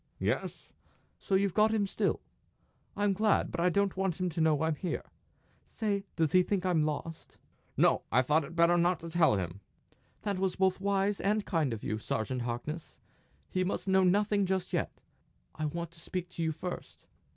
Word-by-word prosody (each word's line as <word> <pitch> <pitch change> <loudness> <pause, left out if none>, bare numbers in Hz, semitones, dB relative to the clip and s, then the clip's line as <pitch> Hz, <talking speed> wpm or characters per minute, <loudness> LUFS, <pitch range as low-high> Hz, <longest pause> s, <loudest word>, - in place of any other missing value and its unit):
"Yes." - - -2 0.5
"So 195 - 0
you've 195 -1 +2
got 215 0 +4
him 215 -2 +2
still! 195 - -1 0.8
I'm 205 -1 +2
glad; 210 +1 +2
but 170 - -4
I 175 +1 +4
don't 200 +1 +1
want 190 -2 -1
him 185 0 0
to 165 0 -2
know 155 -1 +3
I'm 160 0 +2
here. 170 +4 -3 0.6
Stay 205 -3 -2
does 160 -2 +1
he 185 - +6
think 185 0 -1
I'm 175 -4 +3
lost?" 160 +2 -5 0.4
"No. - - +4
I 125 +3 +4
thought 150 +4 +3
it 160 +4 -9
better 170 +1 +5
not 175 +1 +2
to 165 0 -7
tell 160 -9 +4
him." 90 -1 -3 0.6
"That 200 -3 -1
was 190 -1 0
both 190 0 +1
wise 200 0 +1
and 210 +1 +1
kind 160 -7 0
of 110 -2 -5
you, 110 - -2
Sergeant 120 +3 -2
Harkness! 125 +7 -5 0.5
He 185 - +1
must 190 +1 -2
know 190 0 +4
nothing 200 +1 +3
just 190 -1 -1
yet. - - 0 0.6
I 155 - -3
want 170 +2 -4
to 165 - -14
speak 180 +1 -4
to 180 - -6
you 160 -1 +1
first." 175 +3 -7
180 Hz, 190 wpm, -31 LUFS, 160-195 Hz, 0.8 s, he